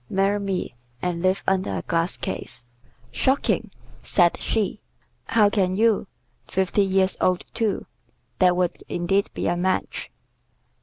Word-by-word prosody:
Marry 195 Hz, +2 st, +2 dB
me, 195 Hz, -7 st, -2 dB, 0.3 s
and 175 Hz, +1 st, -2 dB
live 185 Hz, +1 st, +1 dB
under 190 Hz, -, +1 dB
a 85 Hz, -, -4 dB
glass 165 Hz, +1 st, 0 dB
case." -, -, -4 dB, 0.5 s
"Shocking!" 265 Hz, +1 st, +1 dB, 0.3 s
said 175 Hz, -2 st, +3 dB
she. 210 Hz, -2 st, -1 dB, 0.4 s
"How 220 Hz, -2 st, +4 dB
can 185 Hz, -3 st, +1 dB
you? 220 Hz, -1 st, +3 dB, 0.4 s
Fifty 190 Hz, +2 st, +1 dB
years 190 Hz, -1 st, +2 dB
old, 185 Hz, -1 st, +2 dB
too! 220 Hz, -3 st, -1 dB, 0.5 s
That 180 Hz, -1 st, +5 dB
would 180 Hz, -1 st, -1 dB
indeed 195 Hz, +3 st, +1 dB
be -, -, -2 dB
a -, -, +2 dB
match!" 185 Hz, +2 st, -1 dB
190 Hz, 135 wpm, -24 LUFS, 180-200 Hz, 0.5 s, That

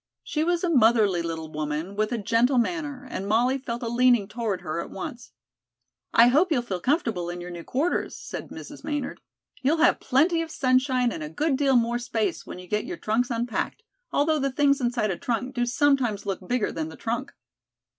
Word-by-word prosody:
She 305 Hz, -, -1 dB
was 345 Hz, +1 st, +1 dB
a 355 Hz, -, +1 dB
motherly 220 Hz, -, +4 dB
little 160 Hz, -2 st, -5 dB
woman, 155 Hz, +5 st, -3 dB
with 215 Hz, +2 st, 0 dB
a 240 Hz, -, 0 dB
gentle 230 Hz, +5 st, +2 dB
manner, 285 Hz, 0 st, -1 dB
and 195 Hz, -, -4 dB
Molly 245 Hz, +5 st, +2 dB
felt 240 Hz, -1 st, -5 dB
a -, -, -2 dB
leaning 240 Hz, -3 st, +3 dB
toward 210 Hz, -4 st, -3 dB
her 170 Hz, -1 st, -3 dB
at -, -, -8 dB
once. 235 Hz, -, -7 dB, 0.8 s
"I 235 Hz, +1 st, +7 dB
hope 320 Hz, +8 st, +3 dB
you'll 250 Hz, -6 st, +2 dB
feel 190 Hz, -6 st, -3 dB
comfortable 230 Hz, -, 0 dB
in 175 Hz, 0 st, -5 dB
your 175 Hz, 0 st, -7 dB
new 170 Hz, -1 st, -7 dB
quarters," 295 Hz, -, -1 dB
said -, -, -7 dB
Mrs. -, -, -10 dB
Maynard. 295 Hz, -2 st, -3 dB, 0.4 s
"You'll 285 Hz, +5 st, +2 dB
have 340 Hz, +2 st, +4 dB
plenty 325 Hz, +6 st, +2 dB
of 325 Hz, -, -4 dB
sunshine 255 Hz, -3 st, +2 dB
and 160 Hz, -, -5 dB
a 150 Hz, -, -5 dB
good 295 Hz, -, 0 dB
deal 270 Hz, -1 st, +2 dB
more 240 Hz, 0 st, +2 dB
space 230 Hz, -3 st, -2 dB
when -, -, -7 dB
you 180 Hz, -, -10 dB
get 210 Hz, +4 st, -1 dB
your 355 Hz, -, -5 dB
trunks 230 Hz, 0 st, 0 dB
unpacked, 235 Hz, -, -2 dB, 0.3 s
although 310 Hz, +2 st, +2 dB
the 275 Hz, -1 st, 0 dB
things 280 Hz, 0 st, +3 dB
inside 240 Hz, -4 st, 0 dB
a 175 Hz, -, -3 dB
trunk 250 Hz, +2 st, -2 dB
do 240 Hz, -2 st, 0 dB
sometimes 245 Hz, -5 st, +2 dB
look 190 Hz, -2 st, -4 dB
bigger 245 Hz, -3 st, 0 dB
than 160 Hz, -1 st, -4 dB
the 160 Hz, -, -11 dB
trunk." 240 Hz, +4 st, -3 dB
240 Hz, 205 wpm, -26 LUFS, 205-275 Hz, 0.8 s, I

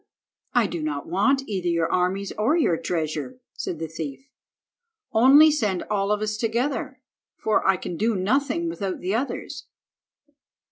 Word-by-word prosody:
"I 240 Hz, -2 st, +5 dB
do 170 Hz, -4 st, -4 dB
not 145 Hz, -2 st, -3 dB
want 270 Hz, +11 st, +2 dB
either 190 Hz, -4 st, -2 dB
your 170 Hz, -1 st, +1 dB
armies 185 Hz, +2 st, 0 dB
or 230 Hz, +10 st, +2 dB
your 235 Hz, -, +3 dB
treasure," 160 Hz, -, -3 dB
said 170 Hz, -, -4 dB
the 160 Hz, +1 st, -4 dB
thief. 160 Hz, -, -7 dB, 0.8 s
"Only 275 Hz, +7 st, +7 dB
send 210 Hz, -11 st, 0 dB
all 200 Hz, -1 st, +1 dB
of 210 Hz, 0 st, 0 dB
us 210 Hz, 0 st, -2 dB
together, 235 Hz, +5 st, -2 dB, 0.3 s
for 215 Hz, -, +1 dB
I 195 Hz, -1 st, +4 dB
can 175 Hz, -2 st, -6 dB
do 225 Hz, +3 st, +1 dB
nothing 280 Hz, -, 0 dB
without 200 Hz, -, -3 dB
the 185 Hz, +2 st, -2 dB
others." 250 Hz, +5 st, -3 dB
205 Hz, 150 wpm, -24 LUFS, 175-255 Hz, 0.8 s, Only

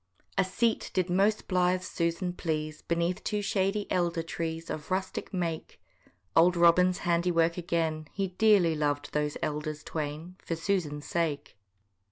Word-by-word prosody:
A 195 Hz, -, +4 dB
seat 225 Hz, +4 st, 0 dB
did 185 Hz, -1 st, +1 dB
most 200 Hz, +4 st, +2 dB
blithe 180 Hz, 0 st, +2 dB
Susan 170 Hz, +1 st, -1 dB
please, 155 Hz, -3 st, -3 dB
Beneath 170 Hz, +3 st, -1 dB
two 210 Hz, -1 st, -1 dB
shady 195 Hz, +1 st, 0 dB
elder 170 Hz, -2 st, +1 dB
trees, 165 Hz, 0 st, -4 dB
Of 155 Hz, 0 st, -6 dB
rustic 190 Hz, 0 st, -2 dB
make: 170 Hz, -4 st, -3 dB, 0.6 s
Old 175 Hz, +2 st, +5 dB
Robin's 180 Hz, +2 st, +5 dB
handiwork 170 Hz, -1 st, +2 dB
again, 165 Hz, -3 st, -1 dB
He 195 Hz, -1 st, -2 dB
dearly 185 Hz, -3 st, +4 dB
lov'd 145 Hz, -1 st, -1 dB
those 150 Hz, 0 st, 0 dB
elders 150 Hz, 0 st, -3 dB
twain 155 Hz, +4 st, -5 dB
For 165 Hz, -, -2 dB
Susan's 165 Hz, -4 st, -1 dB
sake. 165 Hz, -4 st, -2 dB
170 Hz, 140 wpm, -29 LUFS, 160-185 Hz, 0.6 s, Old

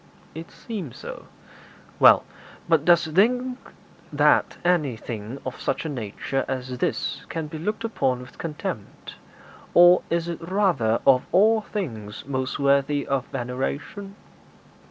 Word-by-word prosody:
'It 165 Hz, +2 st, -8 dB
seems 190 Hz, -, -7 dB
so.' -, -, -9 dB, 0.7 s
'Well, -, -, +7 dB, 0.4 s
but 165 Hz, -3 st, +3 dB
dost 170 Hz, -2 st, +4 dB
think 250 Hz, +8 st, +2 dB, 0.5 s
that -, -, +3 dB
anything 125 Hz, -8 st, -1 dB
of 130 Hz, -, -6 dB
such -, -, -2 dB
a -, -, -2 dB
nature 130 Hz, +1 st, -3 dB
as 130 Hz, -1 st, -4 dB
this -, -, -2 dB
can 165 Hz, -1 st, -3 dB
be 155 Hz, +1 st, -7 dB
looked 210 Hz, +7 st, -3 dB
upon 130 Hz, -, 0 dB
with 125 Hz, 0 st, -14 dB
contempt, 155 Hz, -3 st, -6 dB, 0.6 s
or 175 Hz, +1 st, +8 dB
is 170 Hz, 0 st, 0 dB
it 170 Hz, -1 st, -5 dB
rather 165 Hz, -, +1 dB
of 130 Hz, -2 st, +4 dB
all 215 Hz, +5 st, +4 dB
things 115 Hz, -, -6 dB
most 130 Hz, -1 st, -2 dB
worthy 140 Hz, +1 st, +2 dB
of 135 Hz, -2 st, -1 dB
veneration?' 135 Hz, -, -4 dB
150 Hz, 130 wpm, -24 LUFS, 130-180 Hz, 0.7 s, or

